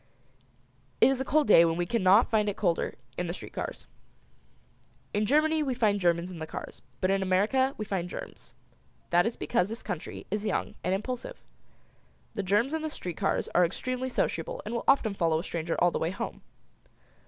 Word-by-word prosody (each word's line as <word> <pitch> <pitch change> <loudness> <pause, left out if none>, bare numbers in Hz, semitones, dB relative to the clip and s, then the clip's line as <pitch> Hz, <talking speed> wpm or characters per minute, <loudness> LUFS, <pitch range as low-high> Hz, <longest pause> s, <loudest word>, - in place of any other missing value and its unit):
It - - +6
is 265 -1 -1
a - - -2
cold 300 +2 +2
day 170 - +8
when 165 0 +1
we 175 - 0
cannot 200 +2 +4
find 210 -2 +3
it 200 - -4
colder 175 -5 0 0.2
in 180 - -1
the 170 - -3
street - - -9
cars. - - -5 1.3
In 210 0 +1
Germany 310 +4 +3
we 270 -4 -1
find 210 -4 +2
Germans 175 0 +1
in 175 - -8
the 160 - -5
cars, - - -8 0.2
but 185 - +2
in 195 0 +2
America 215 +9 +2
we 215 - -3
find 185 -4 -2
germs. - - -9 0.6
That 175 +3 +4
is 230 - -3
because 195 -5 0
this 225 - -6
country 180 -7 -5
is 210 +1 -1
young - - -1
and 185 - +1
impulsive. 245 +5 -5 0.9
The 215 - -2
germs 205 - +1
in 320 - -1
the 315 - -2
street 180 - -6
cars - - 0
are 180 - +5
extremely 255 +9 -2
sociable - - -1
and - - -4
will 235 - -3
often 245 -6 +4
follow 165 -4 +1
a 165 - -3
stranger 165 -2 -3
all 175 0 +4
the - - -2
way 160 - 0
home. 190 - -5
205 Hz, 200 wpm, -28 LUFS, 175-250 Hz, 1.3 s, day